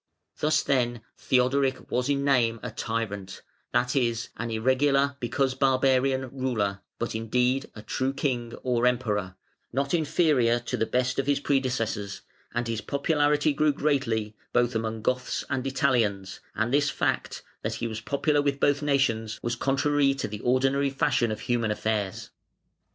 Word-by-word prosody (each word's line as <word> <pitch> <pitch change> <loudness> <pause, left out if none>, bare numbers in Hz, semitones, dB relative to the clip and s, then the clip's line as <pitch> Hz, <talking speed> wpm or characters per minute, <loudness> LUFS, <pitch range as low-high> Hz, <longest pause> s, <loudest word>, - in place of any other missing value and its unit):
Thus 155 0 +2
then 120 -4 0
Theodoric 130 +1 +1
was 125 +2 0
in 140 0 +1
name 120 -5 +2
a - - -4
tyrant 100 -4 -4 0.3
(that 125 +1 +1
is, 120 -3 0
an 115 0 -4
irregular, 135 +5 +2
because 130 +2 0
barbarian, 130 0 +2
ruler), 110 -7 -1 0.2
but 120 - -3
in 110 0 -4
deed 125 +3 +1
a 105 - -9
true 130 +5 -1
King 125 -4 -2
(or 125 -1 +2
Emperor), 105 -6 -1 0.4
not 140 +4 -1
inferior 150 -7 +3
to 120 - -3
the 110 - 0
best 125 +1 0
of 135 - -1
his 145 -1 +2
predecessors, 125 -8 -1 0.3
and 120 0 -2
his 115 -2 -2
popularity 145 +2 +1
grew 150 +2 +3
greatly, 115 -8 0 0.2
both 120 0 +2
among 110 -1 -3
Goths 125 +2 -1
and 130 -1 -1
Italians, 115 -9 0 0.2
and 115 +3 0
this 145 0 +3
fact - - -2 0.2
(that - - -2
he - - -4
was 110 0 -5
popular 145 +4 +1
with 140 -1 0
both 145 0 +2
nations) 135 -7 0
was 120 0 -1
contrary 140 +2 +2
to 135 - -3
the 105 0 -6
ordinary 135 +3 +2
fashion 135 -5 +1
of 110 - -4
human 120 -2 0
affairs. 105 -2 -2
125 Hz, 155 wpm, -27 LUFS, 115-140 Hz, 0.4 s, inferior